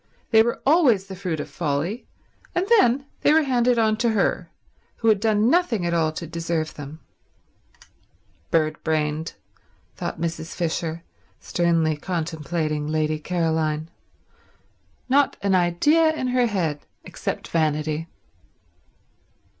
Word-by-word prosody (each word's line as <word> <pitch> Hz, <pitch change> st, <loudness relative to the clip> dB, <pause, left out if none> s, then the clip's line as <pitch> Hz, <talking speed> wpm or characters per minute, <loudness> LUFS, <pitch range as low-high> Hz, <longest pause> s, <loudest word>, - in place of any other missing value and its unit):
They 220 Hz, -, +7 dB
were 235 Hz, +1 st, 0 dB
always 270 Hz, -, +4 dB
the 195 Hz, -1 st, -8 dB
fruit 180 Hz, -4 st, -3 dB
of -, -, -4 dB
folly; 165 Hz, -, -3 dB, 0.5 s
and 355 Hz, -, +1 dB
then 265 Hz, -2 st, +3 dB, 0.2 s
they -, -, +4 dB
were 320 Hz, 0 st, +5 dB
handed 250 Hz, -3 st, +2 dB
on 220 Hz, -1 st, +2 dB
to 235 Hz, +1 st, +1 dB
her, 205 Hz, -, 0 dB, 0.5 s
who 225 Hz, -, +1 dB
had 215 Hz, -2 st, +4 dB
done 215 Hz, 0 st, +2 dB
nothing 255 Hz, -, +2 dB
at 170 Hz, -, 0 dB
all 160 Hz, -2 st, +2 dB
to 170 Hz, -, -5 dB
deserve 165 Hz, -1 st, -3 dB
them. 145 Hz, +2 st, -9 dB, 1.5 s
"Bird 155 Hz, -1 st, 0 dB
brained," 155 Hz, 0 st, -1 dB, 0.6 s
thought -, -, -5 dB
Mrs. 165 Hz, 0 st, -4 dB
Fisher, 165 Hz, -1 st, -2 dB, 0.4 s
sternly 165 Hz, -2 st, +1 dB
contemplating 155 Hz, -2 st, -3 dB
Lady 155 Hz, 0 st, 0 dB
Caroline. 160 Hz, -2 st, -1 dB, 1.2 s
"Not 275 Hz, +2 st, +3 dB
an 200 Hz, -1 st, +2 dB
idea 190 Hz, -, +3 dB
in 255 Hz, -4 st, -2 dB
her 250 Hz, -1 st, +2 dB
head 165 Hz, -9 st, -1 dB, 0.2 s
except -, -, -5 dB
vanity." 155 Hz, 0 st, 0 dB
170 Hz, 125 wpm, -23 LUFS, 155-225 Hz, 1.5 s, They